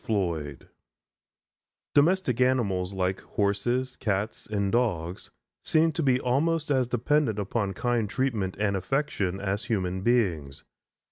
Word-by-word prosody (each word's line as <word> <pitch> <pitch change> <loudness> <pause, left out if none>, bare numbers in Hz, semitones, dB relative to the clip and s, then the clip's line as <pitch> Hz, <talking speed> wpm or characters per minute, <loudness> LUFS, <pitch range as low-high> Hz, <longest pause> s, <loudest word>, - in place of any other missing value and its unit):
FLOYD 85 - -2 1.3
Domestic 145 -5 +3
animals 100 -8 +1
like 95 -1 -1
horses, 120 +6 -1
cats 105 +1 -2
and 100 -2 -1
dogs 95 -8 -1 0.3
seem 160 +1 +3
to 165 - -2
be 130 -4 +3
almost 150 +5 +1
as 130 -3 +2
dependent 125 -1 +1
upon 100 0 -1
kind 120 0 0
treatment 110 -6 -1
and 100 -1 +1
affection 100 -3 -1
as 100 +2 -2
human 95 -4 -1
beings. 90 - 0
110 Hz, 120 wpm, -27 LUFS, 95-130 Hz, 1.3 s, Domestic